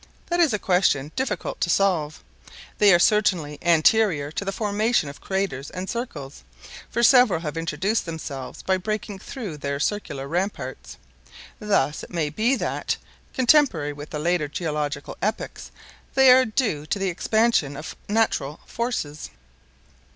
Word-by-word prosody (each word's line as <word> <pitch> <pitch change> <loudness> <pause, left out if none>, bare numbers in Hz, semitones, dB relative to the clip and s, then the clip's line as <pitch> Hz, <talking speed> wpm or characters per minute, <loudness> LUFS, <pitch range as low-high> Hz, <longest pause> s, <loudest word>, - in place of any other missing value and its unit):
That 345 0 0
is 330 -5 +4
a 210 - +1
question 180 -7 +1
difficult 230 -8 -3
to 175 - +1
solve. 170 -5 +1 0.6
They 205 -2 +7
are 175 - +7
certainly 175 -7 +2
anterior 170 -2 +3
to 180 - -3
the 195 - -2
formation 210 -4 0
of 140 - -11
craters 190 -9 -2
and 185 +1 -6
circles, 215 - -6 0.5
for 235 - -1
several 240 -8 +6
have 155 -2 -4
introduced 165 +6 -1
themselves 145 -5 -6
by 190 0 +2
breaking 210 +1 -4
through 205 - -7
their 140 -1 -3
circular 145 -6 -2
ramparts. 175 -5 -4 0.6
Thus 155 -9 +1
it - - -10
may 160 -4 -2
be 225 - +2
that, - - -2 0.4
contemporary 245 - +3
with 145 +1 -9
the 150 - -4
later 160 0 0
geological 150 -2 -3
epochs, 215 +2 -3 0.5
they 265 -1 +7
are 260 +1 +7
due 215 - -1
to - - -1
the 195 -1 -1
expansion 200 -6 +1
of 155 - -7
natural 165 -9 0
forces. 230 -11 -3
180 Hz, 145 wpm, -24 LUFS, 150-215 Hz, 0.6 s, They